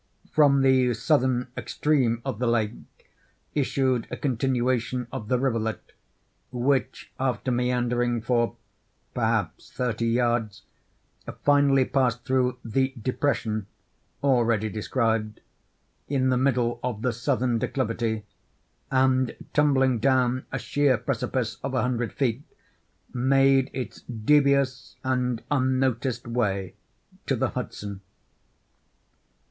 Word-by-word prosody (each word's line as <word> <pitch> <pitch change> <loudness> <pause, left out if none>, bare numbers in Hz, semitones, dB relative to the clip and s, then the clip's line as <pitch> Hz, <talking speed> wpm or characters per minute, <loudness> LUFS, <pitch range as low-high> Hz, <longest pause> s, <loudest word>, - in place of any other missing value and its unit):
From 140 -3 +5
the 130 -2 +4
southern 125 0 +1
extreme 125 -6 0
of 105 - -3
the 125 - 0
lake 115 -2 +1 0.8
issued 130 -4 0
a - - -5
continuation 125 -1 0
of 120 -6 -6
the 125 - +2
rivulet, 115 -4 -2 0.6
which, 130 +2 -1
after 130 0 -1
meandering 120 -1 0
for, 120 0 0 0.6
perhaps, - - -1
thirty 115 -2 -1
yards, 115 -3 0 0.8
finally 140 -2 +4
passed 125 -4 0
through 125 -1 +1
the 130 +4 0
"depression" 110 -4 -1 0.6
(already 115 -5 +2
described) 110 0 -1 0.7
in 130 -2 +1
the 130 - +3
middle 125 -3 +1
of 120 -3 -3
the 125 -2 +1
southern 120 -1 0
declivity, 115 -3 -1 0.7
and 130 -1 +2 0.2
tumbling 135 -4 +3
down 130 0 +1
a 135 - -2
sheer 140 0 +2
precipice 115 0 -2
of 135 -1 -3
a 130 - +2
hundred 120 -2 -1
feet, 130 -3 -1 0.7
made 135 +1 +3
its 130 - -6
devious 140 +2 +1
and 125 -2 -1
unnoticed 130 -3 0
way 100 -6 -1 0.5
to - - +2
the - - 0
Hudson. 100 -2 -6
125 Hz, 110 wpm, -26 LUFS, 115-130 Hz, 0.8 s, From